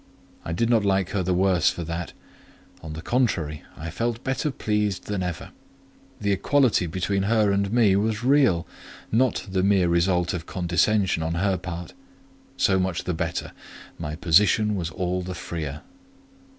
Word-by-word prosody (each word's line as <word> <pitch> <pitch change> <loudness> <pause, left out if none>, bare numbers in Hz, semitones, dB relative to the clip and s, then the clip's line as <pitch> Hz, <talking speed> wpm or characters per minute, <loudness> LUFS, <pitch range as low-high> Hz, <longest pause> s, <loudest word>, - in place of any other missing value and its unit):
I - - -5
did 100 +8 +1
not 115 -3 +3
like 95 -2 +1
her 100 - 0
the 90 +1 -1
worse 90 -2 +3
for 85 - -4
that; 85 +1 -5 0.7
on 80 -1 -7
the 80 +1 -7
contrary, 85 - 0 0.2
I 80 +1 -6
felt 115 +5 -2
better 135 +3 -1
pleased 105 -7 -1
than 100 -2 -2
ever. 90 -2 -4 0.7
The 100 -1 0
equality 120 -2 +2
between 95 +4 -1
her 105 0 +2
and 100 0 0
me 110 -5 +4
was 110 +3 0
real; 130 - +3 0.5
not 125 +2 +1
the 95 -1 0
mere 95 -2 +3
result 90 +1 +2
of 85 -2 -5
condescension 90 +1 +1
on 80 +1 -2
her 95 +2 +1
part: 85 -1 -6 0.6
so 95 -1 +3
much 95 -2 -1
the 90 - -2
better—my 85 -2 -6
position 105 +6 +3
was 85 -4 -2
all 90 +2 -2
the 90 0 -6
freer. 75 -4 -5
95 Hz, 160 wpm, -24 LUFS, 85-105 Hz, 0.7 s, me